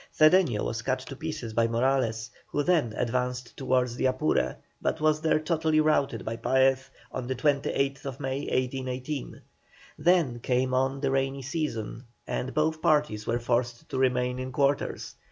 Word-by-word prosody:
Cedeño 155 - +5
was 115 0 -2
cut 130 +2 0
to 135 +1 -9
pieces 155 -6 -5
by 115 +1 +3
Morales, 115 -2 0 0.2
who 145 - -1
then 155 -9 +2
advanced 125 0 -2
towards 125 -2 +1
the 130 - +1
Apure, 130 - +1 0.3
but - - -1
was 155 0 +2
there 160 -1 +3
totally 155 -1 +1
routed 140 -6 +1
by 115 +1 -3
Paez 130 +1 +2 0.2
on 130 -2 -4
the 130 - -1
28th 140 -1 0
May, 135 +1 -2
1818. 130 +2 -3 0.6
Then 155 -7 +3
came 130 +1 0
on 135 +1 +1
the 135 -2 +1
rainy 135 0 0
season, 130 -5 -3 0.2
and 130 - -3
both 155 +1 0
parties 150 -10 +2
were 115 - +1
forced 120 +4 -1
to 130 - -2
remain 125 -1 +1
in 130 0 -4
quarters. 140 +1 0
130 Hz, 155 wpm, -28 LUFS, 125-150 Hz, 0.6 s, Cedeño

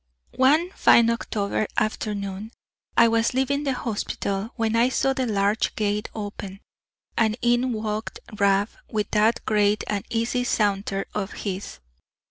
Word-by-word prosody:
One 305 +7 +4
fine 235 -10 +5
October 210 -2 -1
afternoon, 205 -1 -2 0.5
I 235 - +7
was 230 +1 +1
leaving 280 +2 0
the 270 - +1
hospital, 205 -3 -3
when 225 -1 0
I 235 +2 +4
saw 270 +1 +1
the 260 -1 -1
large 205 0 +1
gate 210 0 -1
open, 200 -2 -6 0.6
and 220 -1 +2
in 240 +1 +2
walked 215 -1 -3 0.2
Rab 200 +1 +3 0.2
with 210 -2 -2
that 220 +2 +2
great 210 -1 +2
and 205 -2 -2
easy 235 +2 0
saunter 200 -4 0
of 200 -1 -3
his. 190 - -5
215 Hz, 135 wpm, -24 LUFS, 205-235 Hz, 0.6 s, I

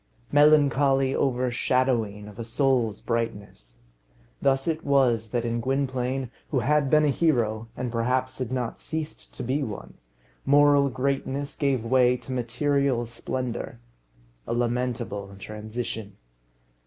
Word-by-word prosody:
Melancholy 140 -2 +4
overshadowing 125 -4 0
of 105 +2 -12
a - - -3
soul's 120 -3 +1
brightness! 100 - -4 0.6
Thus 135 +1 +2
it 160 -1 -1
was 125 -6 +2
that 120 +1 -1
in 115 0 -1
Gwynplaine, 130 -1 -1 0.2
who 130 -5 +1
had 145 +2 +2
been 155 +1 +5
a - - +3
hero, 115 -8 +1
and 125 -1 -3
perhaps 130 +3 -1
had 130 -2 -3
not 125 -3 -3
ceased 155 -1 -5
to - - -5
be 130 +5 0
one, 110 -7 -6 0.5
moral 145 0 +5
greatness 140 +2 -2
gave 135 -5 0
way 125 0 +4
to 130 - -10
material 130 +1 0
splendour. 120 - -4 0.7
A - - -1
lamentable 120 -5 -2
transition! 110 0 -6
125 Hz, 125 wpm, -26 LUFS, 115-140 Hz, 0.7 s, been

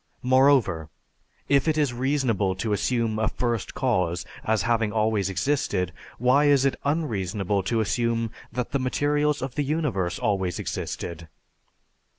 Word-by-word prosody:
Moreover, 130 - +3 0.6
if 140 +1 +3
it 155 -1 +2
is 145 -5 +1
reasonable 120 -7 0
to 105 +3 -1
assume 115 0 0
a 110 - +2
First 120 -4 -2
Cause 90 -10 0 0.2
as 110 -1 +1
having 115 -2 +1
always 110 -3 +1
existed, 90 - 0 0.2
why 130 +5 +4
is 140 -2 +4
it 135 - +2
unreasonable 105 - -1
to 110 +4 0
assume 115 +1 0 0.2
that 125 +1 -3
the 140 - 0
materials 145 +2 +1
of 130 -2 -4
the 145 - -1
universe 135 - -1
always 95 -6 -1
existed? 85 -1 -5
115 Hz, 140 wpm, -25 LUFS, 100-135 Hz, 0.6 s, why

